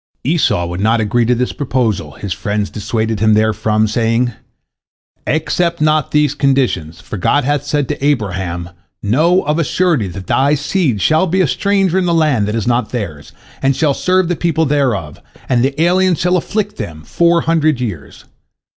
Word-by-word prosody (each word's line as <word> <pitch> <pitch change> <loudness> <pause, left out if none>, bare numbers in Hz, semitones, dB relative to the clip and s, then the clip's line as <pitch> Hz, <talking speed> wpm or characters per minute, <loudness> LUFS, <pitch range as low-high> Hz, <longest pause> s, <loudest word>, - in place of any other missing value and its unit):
Esau 140 - +1
would 85 +1 -5
not 110 +2 +2
agree 115 +2 +1
to 125 +2 +2
this 125 +1 -1
proposal, 115 - -1
his 100 -3 -5
friends 105 0 -3
dissuaded 110 +1 -2
him 110 0 +3
therefrom, 110 0 +1
saying, 115 +2 0 0.9
"Accept 170 +2 0
not 155 0 +2
these 150 -2 +2
conditions, 130 - 0
for - - -7
God 145 +10 +1
hath 145 +1 0
said 145 -2 0
to - - -4
Abraham, 95 -10 -1 0.3
Know 160 - +2
of 150 +3 0
a - - +2
surety 160 - +1
that 95 +1 -8
thy 140 +3 +2
seed 145 - -1
shall 155 - +3
be 185 +3 0
a - - +3
stranger 195 +3 +1
in 180 - 0
a 170 - +1
land 150 -10 +2
that 105 - -2
is 115 - -2
not 120 +1 0
theirs, 85 -12 -5 0.3
and 135 0 +2
shall 150 -1 +2
serve 185 +4 +1
the 175 - 0
people 160 -1 0
thereof, 125 - -1 0.3
and 125 -2 +2
the 135 +2 -1
aliens 180 +1 +3
shall 180 +1 +2
afflict 205 +4 -2
them 85 -9 -7
four 170 - +2
hundred 155 -4 +1
years. 105 - -6
130 Hz, 180 wpm, -16 LUFS, 105-160 Hz, 0.9 s, him